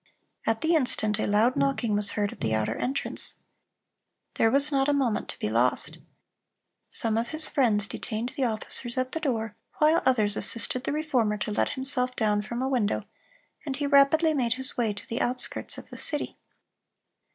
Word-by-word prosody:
At 225 0 0
the 325 +2 +1
instant 220 -8 +2
a - - -1
loud 215 +5 +2
knocking 245 -6 0
was 205 0 0
heard 205 -1 -1
at - - -13
the 110 -1 0
outer 110 -1 -1
entrance. 270 +2 +1 1.0
There 225 - +2
was 280 +4 +5
not 270 0 +1
a - - +2
moment 255 -6 -1
to - - -5
be - - -3
lost. 120 +4 -1 0.9
Some 225 -1 -1
of 235 - -3
his 310 +3 +4
friends 220 -8 +1
detained 225 +3 -5
the 270 - 0
officers 235 +2 -3
at 255 0 -1
the 325 - -3
door, 225 -8 -3 0.2
while 310 +2 +3
others 215 -5 +1
assisted 250 +4 +2
the - - -1
Reformer 260 -9 0
to 210 0 -4
let 205 - 0
himself 255 -1 +2
down 210 -2 0
from 235 +4 -5
a - - -1
window, 245 -6 -1 0.6
and 280 -4 -4
he 290 +1 -3
rapidly 285 +3 +4
made 245 -5 0
his 260 +1 -1
way 230 -3 0
to 205 - -9
the 230 - -3
outskirts 250 +1 0
of - - -12
the - - -9
city. 295 -2 -1
245 Hz, 185 wpm, -26 LUFS, 215-275 Hz, 1.0 s, was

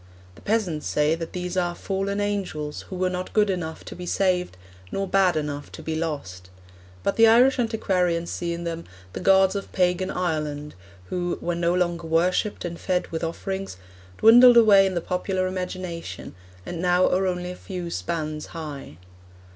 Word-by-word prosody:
The - - -17
peasants 200 -8 -1
say 150 +1 +2
that 165 0 -4
these 180 0 -4
are 175 -1 0
'fallen 195 +2 -2
angels 190 -8 -3
who 190 - -5
were 185 0 0
not 180 0 -5
good 210 -2 +3
enough 160 -3 -5
to - - -8
be 180 0 -7
saved, 180 - 0 0.3
nor 195 0 -2
bad 185 -3 +3
enough 145 -1 -4
to - - -9
be 160 - -3
lost'; 140 - -4 0.5
but - - 0
the 225 0 +7
Irish 250 +4 +5
antiquarians 180 -7 0
see 170 -1 -3
in 170 0 -4
them 170 0 -4 0.3
'the - - -5
gods 190 +1 +4
of 200 - -5
pagan 180 0 +1
Ireland,' 150 -5 -2 0.4
who, 175 -1 -1
'when 170 0 -2
no 170 +1 +2
longer 175 -2 -1
worshipped 180 +6 +1
and 170 -1 -5
fed 180 -1 -1
with 165 0 -4
offerings, 190 - -4 0.4
dwindled 240 +2 +8
away 205 -4 +7
in 190 - -3
the 170 - 0
popular 185 +1 -1
imagination, 185 -2 -5 0.3
and 170 -1 -5
now 180 0 +3
are 190 +1 +1
only 180 0 -2
a - - -7
few 180 -2 -6
spans 155 -3 -3
high.' 145 - -7
180 Hz, 175 wpm, -24 LUFS, 165-190 Hz, 0.5 s, dwindled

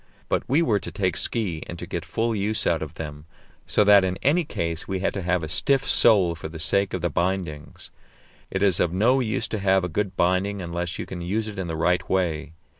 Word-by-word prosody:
But - - +1
we 150 +6 +3
were 105 -9 +2
to - - -7
take 95 -4 -1
ski 95 -9 -1
and 85 - -7
to - - -6
get - - -5
full 115 0 -1
use 105 +2 -1
out 80 - +1
of 80 +1 -6
them, 75 -1 -7 0.4
so - - +3
that 100 -1 +7
in 95 0 -1
any 165 +6 +3
case 85 - -4
we 95 - -2
had 95 - 0
to 95 - -3
have 90 -1 0
a - - -3
stiff 135 - +1
sole 100 -7 +5
for 80 -1 -7
the 80 - -8
sake 100 +5 +1
of 90 - -4
the 85 - 0
bindings. 85 -4 -3 0.6
It 95 +1 -1
is 95 -4 +3
of 85 - +2
no 115 +9 +3
use 110 -5 -1
to 110 - -2
have 95 -1 +3
a - - 0
good 95 +3 -3
binding 95 +3 +1
unless 85 0 -3
you - - -4
can 90 -2 -7
use 105 +6 -2
it 105 -2 -6
in 95 - -3
the 80 - -3
right 90 +2 +1
way. 80 -5 -1
95 Hz, 240 wpm, -24 LUFS, 85-105 Hz, 0.6 s, that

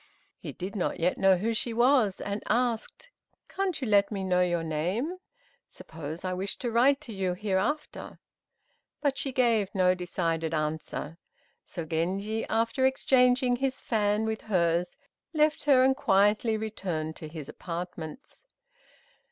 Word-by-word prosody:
He - - -6
did 190 +3 -7
not 185 - -1
yet 175 +2 +1
know 190 -1 +5
who 225 +5 -1
she 230 +1 -2
was, 240 -5 +3
and 200 +1 -3
asked, 240 - -1 0.4
"Can't 385 -4 -2
you 260 - -3
let 200 -1 +4
me 195 -2 -3
know 180 -1 +2
your 175 -2 +1
name? 180 - -2 0.5
Suppose 160 +2 -8
I 185 - -1
wish 190 +2 -3
to 240 - -3
write 265 +5 +4
to 240 -7 -8
you 190 -2 -1
hereafter?" 205 +10 -2 0.8
But 285 -2 +1
she 270 - -2
gave 230 -6 +2
no 185 -1 +4
decided 165 -3 -2
answer; 155 +1 -3 0.5
so 170 -3 -5
Genji, 190 +7 -1
after 230 +3 0
exchanging 250 -1 +3
his 265 0 -1
fan 210 -1 0
with 220 0 -2
hers, 175 -3 +1 0.5
left 305 -1 +2
her 270 -3 +6
and 265 0 +4
quietly 210 -1 +3
returned 180 -8 -4
to 155 - -8
his 155 -2 -8
apartments. 175 - -7
205 Hz, 145 wpm, -28 LUFS, 175-245 Hz, 0.8 s, her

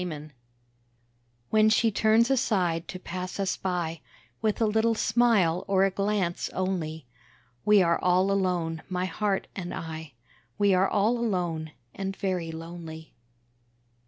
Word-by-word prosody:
TO 155 -4 -5 0.6
—— 120 0 -42
When 215 0 +5
she 225 +1 +3
turns 220 +4 +3
aside 180 -10 +1
to 185 - -6
pass 185 +1 -6
us 195 -1 0
by, 170 -4 -3 0.4
With 215 -1 0
a 225 - +3
little 220 +2 +2
smile 220 -7 +2
or 195 -1 +3
a 195 - +1
glance 195 -3 -1
only 165 -5 -2 0.6
We 210 -2 +6
are 170 -1 +2
all 185 +2 +3
alone, 175 -4 0
my 180 0 -1
Heart 195 +2 -1
and 175 -2 -5
I, 160 -2 -7 0.4
We 200 -1 +4
are 185 +1 +3
all 215 +4 +2
alone, 175 -8 -2 0.2
and 195 0 -4
very 180 -4 -2
lonely. 160 -1 -9
185 Hz, 140 wpm, -27 LUFS, 165-205 Hz, 0.6 s, We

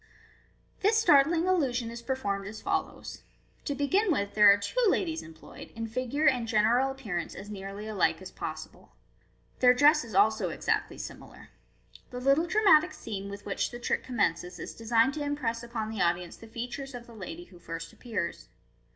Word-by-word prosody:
This 425 +3 +3
startling 325 -5 +4
illusion 255 -11 +1
is 235 0 -8
performed 205 -6 -2
as 215 +1 -7
follows: 390 - -3 0.2
— - - -36
To 285 - -2
begin 365 +9 +2
with, 200 -9 -1
there 210 -1 +8
are 200 - +5
two 205 - -2
ladies 330 -4 0
employed, 160 0 -12
in 225 0 -4
figure 255 +6 -1
and 250 -5 +2
general 235 +4 +3
appearance 210 -11 -4
as 205 +2 -9
nearly 200 +1 -7
alike 170 -7 +1
as 185 - -10
possible. 155 0 -8 0.7
Their 250 0 +6
dress 295 +3 +5
is 225 -4 -9
also 215 +2 +3
exactly - - -1
similar. - - -10 0.6
The 250 - -6
little 275 +6 +3
dramatic 360 -5 +5
scene 200 -2 -6
with 200 0 -9
which 200 - -1
the 240 - -8
trick 240 - -1
commences 180 -7 -1
is - - -7
designed 230 +3 +2
to 295 - -3
impress 260 -6 -2
upon 230 -2 -4
the 220 - -3
audience 175 0 0
the 225 - -13
features 245 +4 -6
of 240 -1 -8
the 235 - -14
lady 180 -5 -8
who 175 0 -17
first 165 -1 -7
appears. 170 - -4
230 Hz, 175 wpm, -29 LUFS, 200-275 Hz, 0.7 s, there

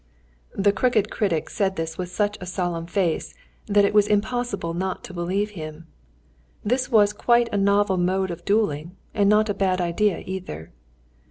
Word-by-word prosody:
The 200 +1 +3
crooked 215 0 +1
critic 185 -8 0
said 195 -2 0
this 165 -1 -3
with 180 0 -4
such 205 +3 0
a 180 - -6
solemn 175 -2 -2
face 175 -3 -1 0.3
that 205 -1 +4
it 200 - 0
was 210 -1 +5
impossible 210 -4 -1
not 185 +2 -3
to - - -9
believe 190 +4 -1
him. 155 -3 -8 0.8
This 255 +4 0
was 210 -4 +4
quite 235 +2 +3
a - - +1
novel 200 -1 +3
mode 185 +1 0
of 170 0 -7
duelling, 180 -4 0 0.2
and 200 -2 +3
not 215 +1 +4
a 205 - 0
bad 190 -2 0
idea 180 +2 0
either. 180 - -6
195 Hz, 170 wpm, -24 LUFS, 175-210 Hz, 0.8 s, was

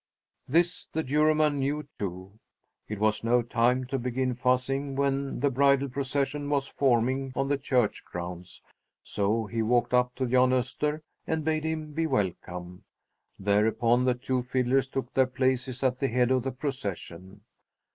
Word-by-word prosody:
This 170 +5 +1
the 160 - -2
Juryman 150 +1 +2
knew, 145 +2 -1
too! 95 +2 -6 0.5
It 105 - -4
was 110 +1 +1
no 120 +1 +3
time 120 +2 +1
to 135 +1 -2
begin 125 +1 -1
fussing 130 +3 0
when 140 0 -1
the 140 -1 +2
bridal 140 +1 +3
procession 140 +2 -2
was 140 -2 +1
forming 130 +1 +1
on 135 0 0
the 145 - +2
church 125 -5 0
grounds; 90 +1 -7 0.4
so 110 +3 0
he 115 +2 -2
walked 120 +2 +1
up 125 0 +2
to 130 - -1
Jan 125 +1 +4
Öster 135 +4 0 0.3
and 160 -1 -1
bade 155 -1 0
him 155 -1 -3
be 165 +1 0
welcome. 90 - -3 0.5
Thereupon 110 +5 +2
the 125 -1 +2
two 125 +1 -1
fiddlers 130 +1 +1
took 130 -2 -4
their 130 -1 +4
places 130 0 -1
at 130 -1 +1
the 135 - +1
head 125 0 +2
of 130 -1 +3
the 135 +2 -3
procession. 100 - -5
130 Hz, 155 wpm, -28 LUFS, 115-140 Hz, 0.5 s, Jan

